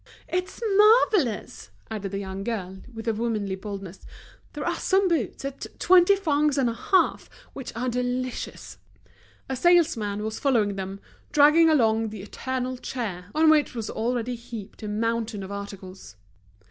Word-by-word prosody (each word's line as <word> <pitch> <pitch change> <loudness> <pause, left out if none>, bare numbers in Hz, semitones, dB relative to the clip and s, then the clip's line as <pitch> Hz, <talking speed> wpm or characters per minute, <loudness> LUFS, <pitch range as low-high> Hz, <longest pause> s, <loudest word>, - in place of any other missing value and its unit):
"It's 365 +1 -3 0.2
marvellous!" 420 - +3 0.2
added 205 -3 -4
the 195 - -3
young 195 0 -5
girl, 190 -4 -4
with 225 -1 -8
her 225 - +1
womanly 215 -3 -2
boldness. 195 -1 -7 0.5
"There - - -5
are - - +1
some 385 0 +2
boots 295 - -1
at 275 0 -5
twenty 370 +2 +6
francs 300 -6 +1
and 265 -3 +3
a 230 - 0
half 375 +10 +1 0.2
which 270 - -7
are 245 +3 -2
delicious!" 250 +1 -3 0.7
A 265 - -2
salesman 255 -11 +2
was 220 0 -4
following 225 -8 +2
them, 195 0 -6 0.3
dragging 300 +3 +6
along 225 -7 +3
the 210 -3 -8
eternal 255 +4 -4
chair, 210 -10 -4
on 315 0 +6
which 300 -4 +2
was 225 -2 -4
already 240 +1 -1
heaped 230 -3 -9
a 215 - -5
mountain 225 0 -2
of 190 - -8
articles. 195 - -8
235 Hz, 150 wpm, -25 LUFS, 205-285 Hz, 0.7 s, twenty